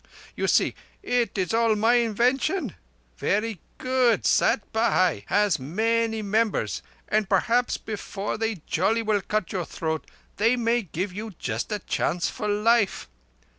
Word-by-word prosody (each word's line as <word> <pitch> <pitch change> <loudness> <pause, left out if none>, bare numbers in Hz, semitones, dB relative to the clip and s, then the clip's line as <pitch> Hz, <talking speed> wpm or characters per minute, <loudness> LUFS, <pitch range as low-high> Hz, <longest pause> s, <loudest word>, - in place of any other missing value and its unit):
You - - -1
see, - - +3 0.3
it 245 -3 0
is 185 +2 -1
all 225 -1 +3
my 225 +3 +3
invention. 245 - +1 0.5
Verree 210 -1 0 0.2
good. 255 -2 +2
Sat - - +2
Bhai 185 - +2
has 205 -6 +2
many 225 - 0
members, 215 +2 0 0.3
and 215 -2 +1
perhaps 235 +5 +2
before 205 -1 -5
they 225 -7 -2
jolly 220 +7 +1
well 210 -2 +1
cut 210 -2 -2
your 185 -2 -1
throat 160 -1 -4 0.3
they 230 +4 +3
may 240 0 +1
give 185 0 -4
you 215 +2 -6
just 115 - -3
a 210 - 0
chance 180 -2 -1
of 210 - -1
life. 210 0 +2
215 Hz, 140 wpm, -25 LUFS, 195-230 Hz, 0.5 s, see